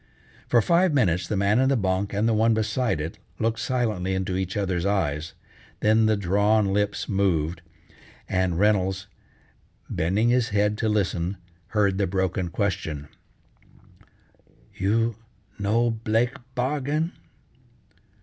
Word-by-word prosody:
For 120 -2 +4
five 170 -2 +3
minutes 90 -9 +2
the 105 - -1
man 100 +4 +3
in 130 0 +3
the 135 - +2
bunk 95 -1 0
and 105 +3 +1
the 115 - +2
one 110 +1 +3
beside 110 -3 0
it 80 +2 -5 0.2
looked 115 0 -1
silently 110 -7 -1
into 95 0 -2
each 95 +1 -2
other's 95 -4 -1
eyes, 80 -6 -1 0.5
then 110 +1 +4
the 110 -1 +2
drawn 100 +2 +2
lips 105 0 -1
moved, 85 -5 0 0.7
and 95 -2 0
Reynolds, 95 -1 +1 0.9
bending 100 +8 +1
his 125 -1 +2
head 105 0 +1
to 110 - +1
listen, 95 -3 0 0.3
heard 100 -3 +1
the 100 - +2
broken 95 -1 -1
question: 85 -7 -3 1.6
"You 110 +3 0 0.4
no 115 +4 +2
blake 115 +2 0 0.2
bargain?" 145 +5 -1
100 Hz, 130 wpm, -25 LUFS, 95-115 Hz, 1.6 s, For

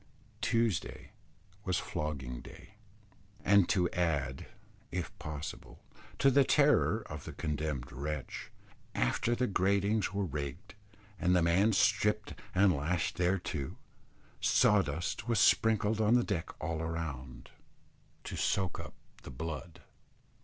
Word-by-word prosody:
Tuesday 115 -5 0 0.5
was 90 -3 0
flogging 75 -9 -4
day; - - -13 0.7
and 100 -3 +5
to 90 -2 +3
add, 75 -7 -1 0.4
if 90 -3 -4
possible, 75 -5 -7 0.3
to 135 - +4
the 140 +1 +6
terror 140 -6 +3
of 75 -1 -7
the - - -6
condemned 75 -4 -3
wretch, 70 +1 -5 0.5
after 60 - +1
the 125 - +1
gratings 100 +1 +1
were 100 0 -1
rigged 75 +5 -5 0.5
and 90 +1 +3
the 90 - +4
man 95 +6 +4
stripped 105 +1 +2 0.2
and 95 0 +5
lashed 80 +4 -1
thereto, 90 -6 -1 0.6
sawdust 85 +1 +2
was 115 -3 +2
sprinkled 110 -1 +3
on 110 +2 +4
the 120 - +4
deck 90 -7 -2
all 80 +1 -2
round, 75 -6 -5 0.7
to - - -6
soak 95 -2 0
up - - -8 0.3
the - - -10
blood. 80 +4 -6
90 Hz, 120 wpm, -32 LUFS, 75-105 Hz, 0.7 s, the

